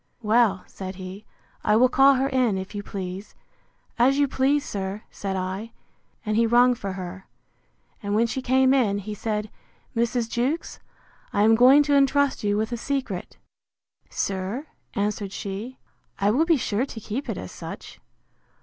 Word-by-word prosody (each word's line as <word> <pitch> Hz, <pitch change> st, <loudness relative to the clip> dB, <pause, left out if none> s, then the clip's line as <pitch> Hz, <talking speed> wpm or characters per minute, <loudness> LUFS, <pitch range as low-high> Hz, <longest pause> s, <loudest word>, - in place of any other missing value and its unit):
Well, 215 Hz, -3 st, +3 dB
said 190 Hz, 0 st, -7 dB
he, 185 Hz, +2 st, -9 dB, 0.4 s
I 210 Hz, -, +3 dB
will 250 Hz, +3 st, +6 dB
call 270 Hz, +2 st, +5 dB
her 265 Hz, +1 st, +1 dB
in, 255 Hz, -7 st, +1 dB
if 190 Hz, +2 st, -6 dB
you 205 Hz, -, -4 dB
please.—As 200 Hz, +6 st, -4 dB
you 285 Hz, 0 st, +3 dB
please, 275 Hz, +2 st, +1 dB
sir, 195 Hz, +1 st, -4 dB
said 195 Hz, -1 st, -4 dB
I. 190 Hz, +4 st, -4 dB, 0.5 s
And 215 Hz, 0 st, 0 dB
he 230 Hz, +1 st, +3 dB
rung 245 Hz, +2 st, +5 dB
for 200 Hz, -5 st, -5 dB
her; 185 Hz, 0 st, -7 dB, 0.7 s
and 205 Hz, -1 st, -2 dB
when 225 Hz, +2 st, +4 dB
she 250 Hz, +3 st, -3 dB
came 260 Hz, +1 st, +3 dB
in, 225 Hz, -7 st, +2 dB
he 205 Hz, +1 st, -5 dB
said, 210 Hz, 0 st, -3 dB, 0.4 s
Mrs. 235 Hz, 0 st, 0 dB
Jewkes, 255 Hz, +8 st, -2 dB, 0.5 s
I 205 Hz, -, +2 dB
am 220 Hz, +1 st, +6 dB
going 255 Hz, +5 st, +7 dB
to 285 Hz, 0 st, +2 dB
entrust 280 Hz, -1 st, +3 dB
you 205 Hz, 0 st, +1 dB
with 220 Hz, +2 st, -1 dB
a 240 Hz, -, -2 dB
secret. 255 Hz, -8 st, -4 dB, 0.7 s
Sir, 195 Hz, +8 st, -3 dB, 0.3 s
answered 205 Hz, -1 st, -1 dB
she, 205 Hz, +7 st, -6 dB, 0.4 s
I 200 Hz, +1 st, +2 dB
will 290 Hz, +9 st, +3 dB
be 330 Hz, -2 st, +4 dB
sure 230 Hz, +1 st, -1 dB
to 230 Hz, -, -8 dB
keep 225 Hz, +6 st, -5 dB
it -, -, -2 dB
as -, -, -7 dB
such. -, -, -9 dB
220 Hz, 165 wpm, -25 LUFS, 200-260 Hz, 0.7 s, going